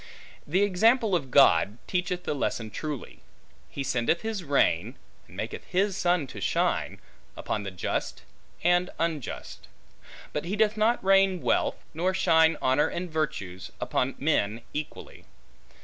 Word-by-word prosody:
The 185 +7 +2
example 215 +2 +3
of 140 -6 -2
God, 110 -6 +5
teacheth 180 -1 -2
the - - -1
lesson 115 -5 -2
truly: 150 -1 -6 0.5
He 140 - -4
sendeth 130 +5 0
his 220 -4 -3
rain, 140 - +1 0.3
and - - -15
maketh - - -5
his 195 +1 0
sun 175 -4 +1
to 130 - -9
shine, - - 0 0.4
upon 105 - -2
the 100 - -5
just 90 -2 -3 0.4
and 175 +2 +3
unjust; 160 -5 -4 0.7
but 150 - -2
he 190 +4 -2
doth 215 0 +2
not 225 +3 +2
rain 195 -1 +4
wealth, - - +1 0.2
nor 180 +4 0
shine 160 -3 +4
honor 130 +3 +3
and 175 -1 -5
virtues, 100 - -3
upon 130 +1 -1
men 115 -7 0
equally. 150 0 -7
165 Hz, 140 wpm, -27 LUFS, 135-185 Hz, 0.7 s, God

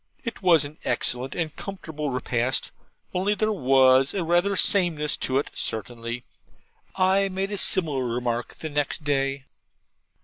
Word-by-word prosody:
It 230 -4 -5
was 170 -6 +5
an 150 +2 -10
excellent 125 +2 0
and 160 -3 -3
comfortable 160 -7 -5
repast; 125 0 -1 0.4
only 195 +3 +1
there 215 +2 +1
WAS 135 -4 +4
rather 175 +2 +2
a - - -2
sameness 165 -8 +3
in 130 - 0
it, 140 - 0
certainly. 115 +3 -4 0.7
I 190 +1 +3
made 195 +1 -2
a 205 - -2
similar 155 -11 +1
remark 120 0 -2
the 160 - -6
next 145 +2 -1
day'. 135 -1 -1
150 Hz, 140 wpm, -25 LUFS, 130-185 Hz, 0.7 s, was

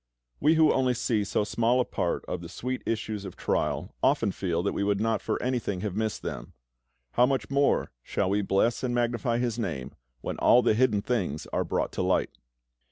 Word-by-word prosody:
We 155 +3 +4
who 160 -1 +5
only 130 -1 +2
see 110 -3 0
so 100 +1 0
small 115 +4 +1
a 125 - +2
part - - -2
of 90 - -4
the 85 - -8
sweet 130 +7 -4
issues 110 -2 -2
of 95 -3 -8
trial - - -1
often 100 - +3
feel 85 -3 -2
that 100 - 0
we - - -1
would 100 0 +1
not 110 0 +1
for - - -2
anything 120 -7 -1
have 100 -3 -3
missed 110 0 -2
them; - - -6 0.6
how 125 +1 +4
much 130 -4 -1
more 140 0 +2
shall 95 +9 -1
we 105 +1 +2
bless 100 +4 +1
and 125 -2 -1
magnify 120 0 0
His 120 -1 -1
Name 75 - -3 0.3
when - - -4
all 125 - +6
the - - +4
hidden 110 -3 +2
things 90 - -1
are - - +1
brought - - -1
to - - -3
light! - - +1
110 Hz, 205 wpm, -27 LUFS, 100-125 Hz, 0.6 s, all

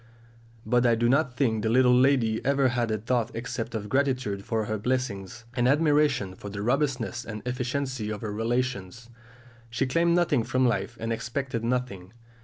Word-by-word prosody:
But 120 +2 +2
I 120 -2 +4
do 120 +1 +1
not 130 -1 +1
think 110 -5 +1
the 110 - 0
little 125 +1 +5
lady 125 -4 +3
ever 135 -1 +3
had 120 -1 -1
a 110 - 0
thought 120 +1 0
except 120 -1 -4
of 105 -1 -4
gratitude 130 -5 0
for 110 -1 -1
her 110 0 -3
blessings, 115 -3 -3
and 120 0 +1
admiration 145 - +2
for 100 +2 -9
the 100 0 -5
robustness 130 -1 0
and 110 -2 -7
efficiency 125 -2 -2
of 105 - -5
her 110 -3 -4
relations. 115 -1 -2 0.6
She 120 +3 -1
claimed 170 +6 +2
nothing 155 -8 +2
from 130 +2 +1
life 110 +1 -1
and 115 0 -2
expected 120 +1 -3
nothing. 115 -6 -2
120 Hz, 175 wpm, -27 LUFS, 110-130 Hz, 0.6 s, little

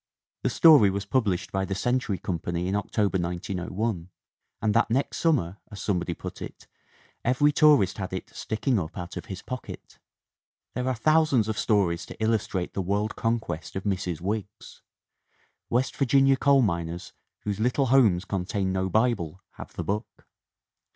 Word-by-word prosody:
"The - - +1
story 150 -11 +7
was 100 +1 -3
published 100 -5 0
by 95 0 0
the 95 0 -3
Century 120 -2 0
Company 85 0 -3
in 95 - 0
October, 100 -1 0
1901, 90 +2 -3 0.5
and 105 0 +1
that - - +3
next 130 +5 0
summer, 115 - +1
as 100 - -8
some 95 -4 0
body 85 -1 -3
put - - -8
it, - - -8 0.6
every 130 +5 +3
tourist 145 - +4
had 95 -1 -4
it, 95 - -6
'sticking 110 +1 -1
up 80 +1 -6
out 90 -2 -6
of - - -6
his 95 -1 -7
pocket/ 130 -1 -8 0.4
" - - -65
There 125 0 -2
are 130 - +1
thousands 140 -2 +3
of 110 -2 -2
stories 95 -6 +1
to - - -10
illustrate 110 -5 -1
the 95 - -1
world 100 +4 -1
conquest 110 -8 -2
of 95 - -3
Mrs. 90 -4 -2
Wiggs. 105 +2 -5 0.9
West 125 +2 0
Virginia 135 0 +4
coal 135 0 +4
miners 85 -3 -3 0.3
whose 105 -1 -3
little 125 +4 +2
homes 105 -9 +4
contain 95 0 -2
no 95 0 0
Bible 100 -6 0 0.2
have - - -9
the - - -4
book. 105 +3 -4
100 Hz, 165 wpm, -26 LUFS, 90-120 Hz, 0.9 s, story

